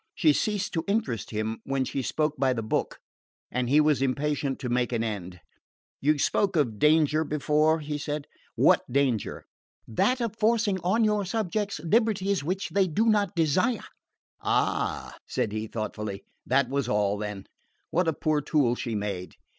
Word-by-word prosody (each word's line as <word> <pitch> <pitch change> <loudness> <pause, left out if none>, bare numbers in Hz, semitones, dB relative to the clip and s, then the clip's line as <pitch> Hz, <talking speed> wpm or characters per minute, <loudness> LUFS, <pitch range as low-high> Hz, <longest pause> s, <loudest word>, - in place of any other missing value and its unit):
She 155 -4 +4
ceased 205 +3 -1
to 165 -2 -1
interest 200 - -1
him 110 +1 -3
when 135 -1 -1
she 135 - -2
spoke 150 +4 0
by 130 -1 +2
the 115 -2 -3
book, 110 - -1 0.5
and 125 -1 -1
he 145 +3 +5
was 150 -2 +3
impatient 140 0 0
to 125 - -5
make 125 0 0
an 115 -2 0
end. 95 -5 -5 0.6
"You 150 +2 +3
spoke 195 +7 +1
of 120 -9 +1
danger 155 0 +4
before," 155 +1 +2
he 150 0 -4
said. 145 -1 -3 0.3
"What - - +5
danger?" 130 -4 0 0.4
"That 250 - +1
of 230 -3 -2
forcing 220 -3 +2
on 190 +7 +2
your 210 -1 +2
subjects 205 -1 -2
liberties 200 -2 +1
which 185 +6 -2
they 195 -1 +2
do 205 +7 +1
not 205 -4 +2
desire!" 180 - +1 0.6
"Ah," - - 0
said 105 - -1
he 110 +1 -3
thoughtfully. 105 -2 -5 0.2
That 130 +1 +3
was 140 +1 -1
all, 105 -1 +1
then. 105 -2 -5 0.5
What 180 0 +1
a 160 - +2
poor 150 0 0
tool 145 -5 +2
she 120 -2 -3
made! 100 -3 -4
150 Hz, 165 wpm, -27 LUFS, 120-185 Hz, 0.6 s, he